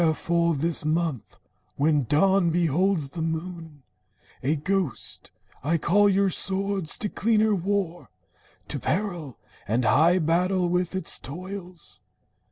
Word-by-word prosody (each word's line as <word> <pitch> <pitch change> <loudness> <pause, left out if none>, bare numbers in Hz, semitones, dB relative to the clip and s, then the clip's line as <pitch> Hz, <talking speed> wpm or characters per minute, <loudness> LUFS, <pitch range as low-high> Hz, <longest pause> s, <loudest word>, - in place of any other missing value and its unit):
Wherefore, 170 +1 +1
this 160 +3 -1
month, 155 -5 -2 0.4
when 145 -1 +2
dawn 180 - +3
beholds 170 -1 +1
the 165 - -5
moon 160 -2 -5 0.6
A 145 +5 +1
ghost, 185 -2 -2 0.3
I 165 +4 +1
call 205 +6 +3
your 195 0 +2
swords 195 -2 0
to 220 - -2
cleaner 215 +1 +2
war, 190 -2 -2 0.6
To - - -3
peril, 175 - -2 0.3
and 115 +3 0
high 165 +9 +4
battle 180 +2 +1
with 180 +1 -1
its 190 - -1
toils. 180 +3 -9
170 Hz, 120 wpm, -25 LUFS, 155-190 Hz, 0.6 s, high